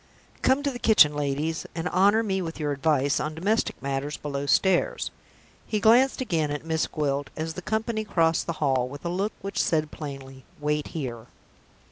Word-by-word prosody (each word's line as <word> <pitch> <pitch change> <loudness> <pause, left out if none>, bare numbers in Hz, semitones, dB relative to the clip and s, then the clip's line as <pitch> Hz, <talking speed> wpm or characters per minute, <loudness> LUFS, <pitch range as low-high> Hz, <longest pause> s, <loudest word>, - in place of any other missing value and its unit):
Come 265 +2 +3
to 285 - 0
the 245 - -7
kitchen, 210 -11 +6
ladies, 150 +2 -2
and 165 +1 -2
honor 205 +4 +4
me 190 -3 -1
with 165 -2 -5
your 150 -1 -1
advice 140 0 +1
on 155 +1 -3
domestic 205 +7 0
matters 140 +2 -2
below 140 -1 -4
stairs." 190 +4 +2 0.6
He 215 - 0
glanced 245 +6 +4
again 165 -11 0
at 145 +2 -4
Miss 160 -1 0
Gwilt 145 -2 -2
as 160 +1 -3
the 185 - -6
company 220 +2 -1
crossed 165 -6 +1
the 170 - -1
hall, 130 -4 +1
with 145 +5 -10
a - - 0
look 195 +5 -1
which 195 - -1
said 155 -2 0
plainly, 135 -3 -8 0.2
"Wait 150 0 -1
here." 120 -5 -5
160 Hz, 180 wpm, -26 LUFS, 145-195 Hz, 0.6 s, kitchen